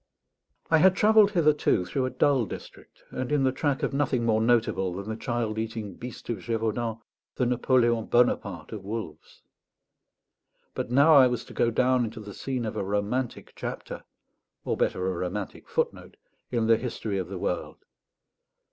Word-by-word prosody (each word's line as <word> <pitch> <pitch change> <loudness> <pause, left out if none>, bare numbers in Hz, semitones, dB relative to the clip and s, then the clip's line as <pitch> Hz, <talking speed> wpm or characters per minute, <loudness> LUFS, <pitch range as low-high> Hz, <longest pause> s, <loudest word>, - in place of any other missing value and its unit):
I 160 - +6
had 185 +3 +5
travelled 215 0 +5
hitherto 150 - +2
through 130 +7 -1
a - - -2
dull 130 -2 +2
district, - - -11
and 130 +2 -4
in 145 -2 +2
the 130 - +3
track 135 +1 -1
of - - 0
nothing 135 -4 0
more 110 -1 +2
notable 110 -6 +1
than 100 +2 -6
the 110 - -3
child 115 -1 -2
eating 110 -3 -4
Beast 125 +6 -9
of 115 -4 -2
Gévaudan, 115 +2 -2 0.4
the 125 - +1
Napoléon 120 -2 +2
Bonaparte 105 -8 +1
of 105 -4 -7
wolves. 100 -7 -7 1.3
But - - -4
now 140 +6 +6
I 135 -3 +8
was 120 -2 -3
to - - -12
go 120 - +2
down 125 +2 +2
into 115 0 -5
the 105 -2 -9
scene 130 0 -3
of 110 - -4
a - - -2
romantic 105 +6 -2
chapter - - -6 0.6
or, - - 0
better, 90 - 0
a 95 - +1
romantic 90 +3 -5
footnote - - -2 0.3
in 120 -2 0
the 115 0 +5
history 110 -4 -3
of 90 - -3
the 95 0 -6
world. 90 0 -3
115 Hz, 170 wpm, -27 LUFS, 105-130 Hz, 1.3 s, I